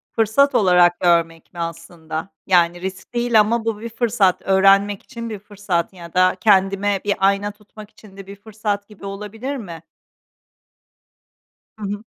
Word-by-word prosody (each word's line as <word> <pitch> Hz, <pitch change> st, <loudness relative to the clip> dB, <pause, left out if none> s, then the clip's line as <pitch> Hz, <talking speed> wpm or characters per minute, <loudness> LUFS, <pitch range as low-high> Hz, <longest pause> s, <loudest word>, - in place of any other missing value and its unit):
fırsat 225 Hz, +6 st, +2 dB
olarak 180 Hz, -3 st, +4 dB
görmek 170 Hz, -2 st, +1 dB
mi 175 Hz, -, -10 dB
aslında? 165 Hz, 0 st, -6 dB, 0.2 s
Yani, 175 Hz, -1 st, +3 dB
risk 190 Hz, +4 st, -7 dB
değil 240 Hz, -2 st, +2 dB
ama 225 Hz, +2 st, +1 dB
bu 225 Hz, -2 st, -2 dB
bir 230 Hz, +2 st, -6 dB
fırsat, 220 Hz, -5 st, +1 dB
öğrenmek 195 Hz, +1 st, +3 dB
için 230 Hz, -3 st, -8 dB
bir 215 Hz, -2 st, -6 dB
fırsat 195 Hz, -4 st, -3 dB
ya 170 Hz, -2 st, -12 dB
da 185 Hz, 0 st, +3 dB
kendime 195 Hz, -1 st, +2 dB
bir 205 Hz, -, +1 dB
ayna 200 Hz, +1 st, +1 dB
tutmak 210 Hz, 0 st, -15 dB
için 205 Hz, -3 st, -18 dB
de 195 Hz, -1 st, -10 dB
bir 200 Hz, -, -9 dB
fırsat 205 Hz, -1 st, -4 dB
gibi 210 Hz, -2 st, -13 dB
olabilir 210 Hz, +7 st, -6 dB
mi? 170 Hz, -8 st, -9 dB, 2.0 s
Hı 210 Hz, -, -8 dB
hı. 205 Hz, +1 st, -5 dB
200 Hz, 155 wpm, -20 LUFS, 180-215 Hz, 2.0 s, olarak